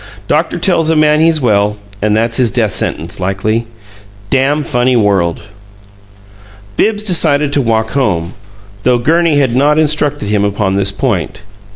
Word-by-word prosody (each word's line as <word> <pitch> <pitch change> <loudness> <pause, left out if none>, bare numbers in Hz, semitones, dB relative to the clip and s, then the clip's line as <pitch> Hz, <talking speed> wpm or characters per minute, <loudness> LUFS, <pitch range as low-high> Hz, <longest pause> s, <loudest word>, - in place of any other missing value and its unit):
"Doctor - - 0
tells 165 -4 +1
a 160 - +2
man 155 0 +3
he's 160 0 +2
well, 105 -4 +1 0.2
and 105 +1 +1
that's 115 +1 0
his 125 -3 +2
death 110 -1 0
sentence, 85 +3 -2
likely. 110 +5 -2 0.6
Dam' 140 +3 +1
funny 125 -2 0
world!" 100 -6 +1 1.3
Bibbs 210 - 0
decided 150 -7 +2
to 145 - +2
walk 110 -2 -1
home, 95 -10 -1 0.5
though 125 +3 +2
Gurney 160 +4 +1
had 130 -4 +1
not 145 +3 +2
instructed 150 -6 0
him 105 -1 +1
upon 100 -1 -1
this 100 0 0
point. 105 - -3
120 Hz, 150 wpm, -13 LUFS, 105-150 Hz, 1.3 s, man